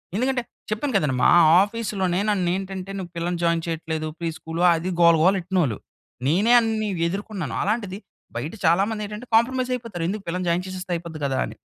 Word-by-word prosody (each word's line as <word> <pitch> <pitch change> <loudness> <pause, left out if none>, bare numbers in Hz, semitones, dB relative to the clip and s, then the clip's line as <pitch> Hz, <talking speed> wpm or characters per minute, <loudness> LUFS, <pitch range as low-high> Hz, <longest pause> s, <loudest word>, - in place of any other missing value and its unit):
ఎందుకంటే, 255 +3 +1 0.3
చెప్పాను 235 +6 -2
కదండి! 150 -8 0
మా - - +6 0.3
ఆఫీస్‌లోనే 200 -4 -2
నన్నేంటంటే, 190 0 -2
నువ్వు 175 -2 -7
పిల్లని 170 +1 -2
జాయిన్ 170 0 +2
చెయ్యట్లేదు 160 -1 -3
ఫ్రీ 170 -1 -2
స్కూల్ 165 +1 -5
అది 165 +3 -3
గోల, 170 -1 +7
గోల 190 +3 +5
ఎ‌ట్టినోళ్ళు. 170 - 0 0.5
నేనే 200 - +3
అన్ని 220 -2 -1 0.2
ఎదుర్కొన్నాను. 195 -3 -4
అలాంటిది 205 -2 -2 0.4
బయట 140 +7 -4
చాలా 170 +4 +4
మంది 220 -1 -4
ఏంటంటే, 210 +4 -8
కాంప్రమైజ్ 255 +2 +2
అయిపోతారు. 225 -8 -6
"ఎందుకు 205 +1 -4
పిల్లని 180 +2 -2
జాయిన్ 170 +2 +1
చేసేస్తే 185 -1 -6
అయిపోద్ది 165 -2 -7
గదా!" 135 -1 0
అని. - - -9
185 Hz, 170 wpm, -23 LUFS, 170-215 Hz, 0.5 s, గోల